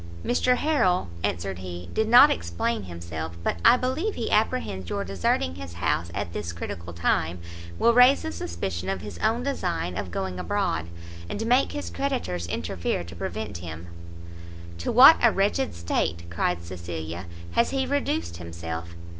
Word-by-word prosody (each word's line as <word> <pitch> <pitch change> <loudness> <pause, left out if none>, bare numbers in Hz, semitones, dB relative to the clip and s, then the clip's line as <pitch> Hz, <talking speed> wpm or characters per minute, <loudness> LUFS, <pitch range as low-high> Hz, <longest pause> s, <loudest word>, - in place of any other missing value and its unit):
"Mr 250 +1 +3
Harrel," 230 - +2
answered 90 +1 -2
he, 90 -1 -7
"did 220 - +1
not 240 +2 +9
explain 85 +6 -2
himself; 85 -2 -6
but 85 - 0
I 250 - +7
believe 270 +12 -1
he 230 - -3
apprehends 210 - 0
your 100 - -1
deserting 90 -2 0
his 90 -1 -8
house 85 0 0
at 100 -4 -3
this 85 -5 -4
critical 85 0 -6
time, 85 0 0 0.4
will 235 - +4
raise 250 +5 +6
a 320 - -2
suspicion 85 - -4
of 95 -1 -2
his 105 0 -8
own 225 +3 +1
design 90 - -2
of 90 - -4
going 90 +1 -3
abroad, 80 -2 -1 0.4
and 225 - -3
make 250 +4 +3
his 290 - -5
creditors 245 - -2
interfere 85 +1 -2
to 85 0 -10
prevent 95 +2 -4
him." 85 0 -8 0.9
"To 85 - -2
what 270 +7 +9
a 235 - +6
wretched 205 +7 0
state," 85 0 -1
cried 85 0 -1
Cecilia, 85 -1 -6 0.2
"has 235 - +2
he 270 -1 0
reduced 85 - -1
himself! 85 0 -6
90 Hz, 160 wpm, -26 LUFS, -, 0.9 s, not